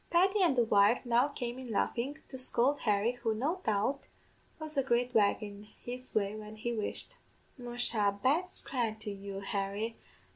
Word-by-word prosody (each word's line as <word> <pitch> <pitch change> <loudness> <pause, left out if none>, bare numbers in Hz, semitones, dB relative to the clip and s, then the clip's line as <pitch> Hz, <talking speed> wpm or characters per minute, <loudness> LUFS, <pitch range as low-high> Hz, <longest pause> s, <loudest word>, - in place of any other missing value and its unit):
"Paddy 385 +4 +4
an' 340 -7 +4
the 240 - +4
wife 210 +3 +4
now 240 +3 +4
came 245 -3 -5
in 255 -2 -8
laughin', 240 +6 -1
to - - -8
scould 255 +3 +1
Harry, 210 +1 +3
who, 225 -2 +1
no 310 +11 -1
doubt, 215 +7 +1 0.6
was 310 -1 -6
a 275 - +3
great 250 -1 +1
wag 210 +1 +3
in 205 0 -8 0.2
his 250 +1 -4
way 205 -1 +1
when 215 0 -8
he 235 +2 -3
wished. 215 -2 -4 0.4
'Musha, 240 -5 +1
bad 325 +8 +3
scran 235 -5 -2
to 215 -1 -5
you, 200 0 -6
Harry 200 +3 -2
235 Hz, 175 wpm, -32 LUFS, 210-260 Hz, 0.6 s, Paddy